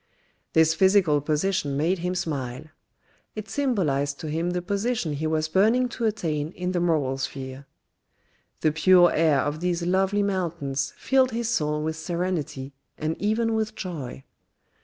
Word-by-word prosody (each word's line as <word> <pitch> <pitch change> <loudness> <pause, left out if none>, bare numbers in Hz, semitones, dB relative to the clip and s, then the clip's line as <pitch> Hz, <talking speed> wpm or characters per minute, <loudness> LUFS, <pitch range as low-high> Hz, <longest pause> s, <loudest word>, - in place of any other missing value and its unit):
This 160 0 +5
physical 190 -6 +4
position 150 -1 0
made 170 +5 +1
him 180 +2 -2
smile. 140 -6 -3 0.7
It 215 -1 -6
symbolised 155 - 0
to 155 - -5
him 165 +3 -1
the 180 0 -1
position 200 -3 -1
he 155 +2 -2
was 155 0 0
burning 225 +9 +3
to 235 -1 -3
attain 160 -9 -1
in 180 0 -3
the 180 - 0
moral 150 -6 +1
sphere. 130 +1 -6 0.9
The 155 - +3
pure 175 +2 +5
air 155 -4 +3
of 145 +1 -2
these 175 0 -1
lovely 190 +3 +2
mountains 170 -9 -2
filled 265 -1 +3
his 235 -1 -2
soul 150 -7 0
with 160 0 -2
serenity 160 -5 -3 0.2
and 155 +1 -2
even 225 +2 +1
with 220 0 -1
joy. 150 -8 -6
170 Hz, 150 wpm, -25 LUFS, 150-195 Hz, 0.9 s, This